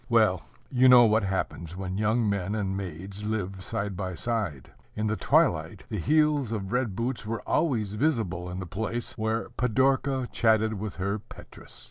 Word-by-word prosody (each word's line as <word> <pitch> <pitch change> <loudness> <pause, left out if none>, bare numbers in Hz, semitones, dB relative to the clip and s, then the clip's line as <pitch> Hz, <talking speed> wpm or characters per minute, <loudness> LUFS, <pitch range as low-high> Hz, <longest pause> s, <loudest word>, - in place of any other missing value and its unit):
Well, - - +4 0.3
you 130 0 +5
know 125 -1 +9
what 110 0 +3
happens 95 -3 -3
when 95 0 -3
young 110 +2 +2
men 100 0 -1
and 95 -3 -1
maids 95 +1 -6
live 95 -3 -3
side 100 +1 -3
by 95 -1 -4
side. 95 - -3 0.2
In 110 - -1
the 110 0 +1
twilight 95 - +1
the 105 - -3
heels 150 - +2
of 100 -3 -3
red 125 -6 0
boots 120 +2 -2
were 115 +2 -5
always 115 -11 +1
visible 105 - 0
in 90 - -5
the 95 - -4
place 110 +6 -4
where 110 +1 -2
Pidorka 130 +2 +1
chatted 110 -1 +3
with 105 0 -5
her 100 +3 -2
Petrus. 110 - -14
110 Hz, 170 wpm, -27 LUFS, 95-120 Hz, 0.3 s, know